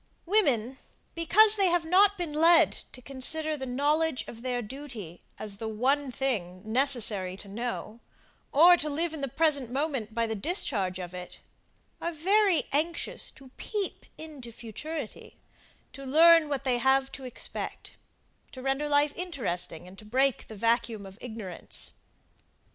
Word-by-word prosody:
Women, 270 - +1 0.3
because 420 +6 +6
they 390 -2 +4
have 345 -1 +1
not 395 +4 +4
been 340 -4 -4
led 330 +3 +5
to 255 - -7
consider 305 +4 +3
the 265 -3 -6
knowledge 295 +3 0
of 230 - -10
their 245 -1 -2
duty 220 - -8 0.2
as 205 -2 -4
the 225 - -4
one 260 +5 0
thing 200 -9 -3
necessary 220 -6 +2
to 200 - -11
know, 230 +1 -5 0.5
or, 345 +5 +7
to 305 -2 -2
live 320 +3 -2
in 310 - -6
the 275 - -1
present 285 -2 +1
moment 260 -5 -3
by 230 0 +1
the 225 - -3
discharge 200 - -1
of 180 -1 -7
it, 180 0 -9 0.6
are 340 - -2
very 380 +3 +2
anxious 325 +4 -1
to 265 -1 -16
peep 415 -3 -4
into 295 -7 -10
futurity, 245 +8 -8 0.6
to 275 - -10
learn 320 +3 +5
what 280 -3 -3
they 250 -2 0
have 265 +1 +2
to 270 - -9
expect 250 -2 -6 0.6
to 260 - -9
render 270 +2 -1
life 290 0 +2
interesting, 195 - -4
and 190 +1 -14
to - - -13
break 260 +4 0
the 220 - -10
vacuum 230 -1 0
of 195 +2 -13
ignorance. 220 -7 -5
270 Hz, 155 wpm, -28 LUFS, 225-315 Hz, 0.6 s, or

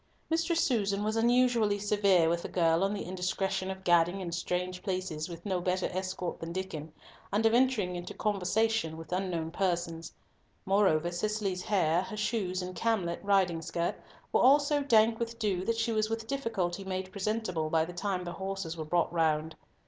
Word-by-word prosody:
Mistress 330 +1 +2
Susan 205 -5 +1
was 215 +1 -1
unusually 235 -2 +3
severe 200 -4 +3
with 170 +1 +1
the - - -6
girl 165 0 +2
on 195 - +1
the 205 - -3
indiscretion 185 +1 -2
of 190 0 -6
gadding 175 +1 +3
in 180 -3 -4
strange 180 +1 -2
places 185 -5 -3
with 170 +2 -9
no 185 -3 -1
better 185 +1 0
escort 185 -1 -3
than 165 0 -5
Diccon, 165 -4 -5 0.4
and 215 +3 +1
of 225 - +4
entering 235 -8 +2
into 175 0 -6
conversation 210 -3 0
with 165 +1 -10
unknown 180 -3 -2
persons. 170 -3 -2 0.5
Moreover, 190 -4 +3
Cicely's 195 0 -1
hair, 175 -5 +2
her 215 +3 -7
shoes, 205 -4 -1
and 180 0 -6
camlet 195 -7 0
riding 190 -4 +2
skirt 170 +1 -1 0.4
were - - +4
all 275 +3 +8
so 290 0 0
dank 225 -4 +4
with 230 0 -3
dew 200 -5 0
that 230 0 0
she 230 +1 0
was 215 -1 +1
with 225 0 -3
difficulty 220 -9 -2
made 190 0 -4
presentable 195 -6 -2
by 160 0 +2
the 175 - -8
time 185 0 -2
the 175 - -5
horses 190 -3 -4
were 160 -2 -5
brought 170 +2 +1
round. 160 -1 +1
190 Hz, 180 wpm, -30 LUFS, 175-215 Hz, 0.5 s, all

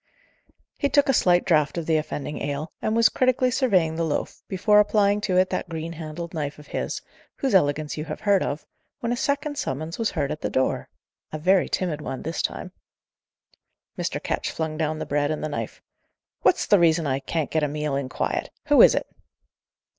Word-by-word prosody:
He 285 - +1
took 285 -1 +3
a - - +5
slight 180 -6 +3
draught 155 -4 +2
of 170 - -2
the 160 -1 +2
offending 150 -1 -4
ale, 145 +3 -3
and 215 - 0
was 230 -1 +6
critically 255 0 +2
surveying 185 - +2
the 165 - 0
loaf, 160 -3 -2
before 210 +2 +4
applying 205 -1 +3
to 190 -3 0
it 185 0 +3
that - - -2
green 165 0 -5
handled 165 +1 -7
knife 145 -3 -3
of 150 - -13
his, - - -4 0.3
whose 270 -4 -1
elegance 150 -4 +2
you 155 - -3
have - - -6
heard 200 -2 +3
of, 145 +2 -3 0.4
when 235 - -1
a - - +1
second 285 +3 -1
summons 155 - -4
was 225 - +1
heard 145 -6 -2
at 155 - -5
the - - -1
door 130 - 0 0.4
a 155 - -3
very 185 +4 +3
timid 165 -5 -1
one 135 - -5
this 165 0 -2
time. - - -4 1.2
Mr. - - -2
Ketch - - -2
flung 160 -1 -3
down 155 0 -1
the - - -4
bread 145 0 0
and 155 0 -3
the 155 - -2
knife. 115 -6 -5 0.6
"What's - - +3
the 205 - +5
reason 165 -1 +3
I 135 -1 0
can't 150 +2 -3
get 160 - +1
a 150 - +1
meal 150 -1 -2
in 135 -2 -2
quiet? - - -2 0.2
Who - - +7
is - - +8
it?" - - -1
160 Hz, 205 wpm, -24 LUFS, 150-200 Hz, 1.2 s, is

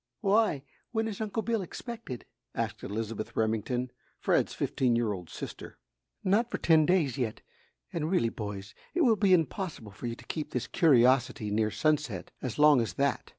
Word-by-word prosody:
"Why, 200 -8 +3 0.3
when 225 -1 0
is 215 -1 -5
Uncle 220 +1 -2
Bill 230 -2 0
expected?" 220 - -7 0.3
asked - - -2
Elizabeth 110 +1 -4
Remington, 115 +3 0 0.3
Fred's - - +1
fifteen 125 -3 +1
year 115 -3 +1
old 90 -4 -8
sister. - - -8 0.5
"Not 210 +5 +2
for - - -2
ten 160 -2 +4
days 160 -9 +2
yet, 115 -4 -2 0.5
and 160 -2 -1
really, 145 -11 +2
boys, 100 -3 -6 0.2
it 355 - +2
will 240 -8 +5
be 200 -2 +2
impossible 160 - 0
for 110 +5 -6
you 115 - -3
to - - -15
keep 155 -2 -4
this 125 -1 -1
curiosity 125 -7 +3
near 110 +1 +2
Sunset 145 - 0
as 125 -4 -4
long 150 -3 +6
as 110 -8 -2
that! - - 0
135 Hz, 170 wpm, -29 LUFS, 115-190 Hz, 0.5 s, long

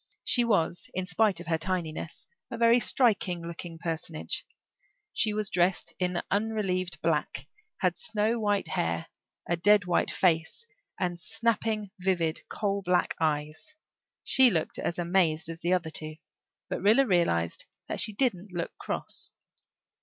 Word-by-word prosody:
She 245 -3 +4
was, 175 -7 0
in 185 0 -1
spite 185 +1 +2
of 175 - -8
her 165 -1 0
tinyness, 170 -2 -3 0.2
a 235 - -5
very 235 +1 +5
striking 200 -9 +2
looking 170 0 -7
personage; 160 - -2 0.7
she 215 - +2
was 210 -1 -2
dressed 180 +1 +1
in 180 -1 -1
unrelieved 195 -4 -1
black, 150 -4 -1 0.4
had - - +2
snow 230 - 0
white 205 -5 0
hair, 85 - -1 0.4
a 170 - +1
dead 205 +2 +5
white 180 - +1
face, 165 - +1 0.3
and 175 -2 -1
snapping, 215 +3 -1
vivid, 175 -4 0
coal 200 -1 -1
black 180 -1 +1
eyes. 155 - -2 0.5
She 260 -2 +6
looked 165 -7 -2
as 170 - -2
amazed 175 -1 +1
as 165 0 -6
the 175 +2 +1
other 170 -3 0
two, 155 0 -5 0.5
but - - -4
Rilla 220 +8 +5
realized 170 - +1 0.2
that - - -3
she 215 - +3
didn't 205 -4 -1
look 175 -1 -4
cross. - - -5
180 Hz, 145 wpm, -28 LUFS, 165-210 Hz, 0.7 s, She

